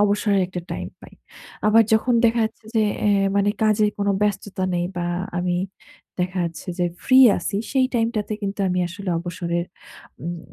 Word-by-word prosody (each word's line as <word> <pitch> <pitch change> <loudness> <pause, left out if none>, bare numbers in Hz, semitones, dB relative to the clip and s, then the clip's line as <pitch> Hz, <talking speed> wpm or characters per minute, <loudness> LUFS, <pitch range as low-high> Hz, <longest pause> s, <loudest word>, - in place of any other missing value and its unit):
অবসরের 205 -1 +2
একটা 180 -1 -5
time - - -4
পাই। - - -14 0.5
আবার 225 +2 +6
যখন 235 +3 +3
দেখা 230 0 +3
যাচ্ছে 220 - -32
যে, 220 - +4 0.2
এ - - +4 0.3
মানে 200 0 +3
কাজের 215 -1 +3
কোন 200 0 0
ব্যস্ততা 205 -2 -1
নেই 175 0 0
বা 175 0 -1 0.3
আমি 175 0 0 0.6
দেখা 180 +1 -1
যাচ্ছে 170 +2 -6
যে 175 - +2 0.2
free 260 0 +7
আছি, 200 - -3
সেই 260 -1 +3
time 230 -1 +2
টাতে 210 0 -2
কিন্তু 200 0 -3
আমি 180 0 0
আসলে 190 +2 -7
অবসরের 170 0 -3 0.6
উম 170 0 -4
200 Hz, 170 wpm, -22 LUFS, 175-215 Hz, 0.6 s, free